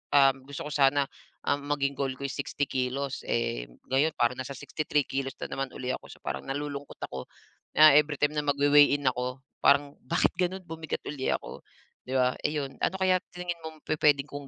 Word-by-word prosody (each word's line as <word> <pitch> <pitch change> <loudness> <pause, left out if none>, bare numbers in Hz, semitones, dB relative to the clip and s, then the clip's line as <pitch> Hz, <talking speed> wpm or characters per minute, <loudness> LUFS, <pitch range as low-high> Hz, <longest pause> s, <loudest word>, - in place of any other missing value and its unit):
um, 135 -1 +7
gusto 140 0 -6
ko - - -7
sana, 140 0 +4 0.4
um, 145 - +2 0.2
maging 140 -1 0
goal 135 -1 0
ko 140 - -9
is - - -5
60 145 0 -2
kilos, 130 +1 -2
eh, - - -1 0.2
ngayon 150 +4 +3
parang 120 +2 +1
nasa 130 +2 -4
63 145 +2 -1
kilos 135 0 -3
na - - -2
naman 135 - 0
uli 130 0 -3
ako. - - -12
So - - -13
parang 65 - -4
nalulungkot 145 0 -5
ako 65 -1 -6 0.5
na 155 -1 +9
every 150 0 +4
time 145 0 +3
na 150 0 0
magwe-weigh-in 145 0 +5
ako 125 +1 -4 0.2
parang 140 0 +4 0.2
bakit 170 - +2
gano'n 185 +1 0
bumigat 160 -1 -5
uli 140 -3 -3
ako, - - -7 0.5
'di 130 - -2
ba, 125 0 +4 0.2
iyon. 140 -3 -3
Ano 190 - +1
kaya 185 -1 +3
sa 180 - -13
tingin 175 -1 -3
mong 160 -1 -9
pupuwedee 150 -3 +3
kong 145 -1 -8
140 Hz, 195 wpm, -28 LUFS, 135-150 Hz, 0.5 s, na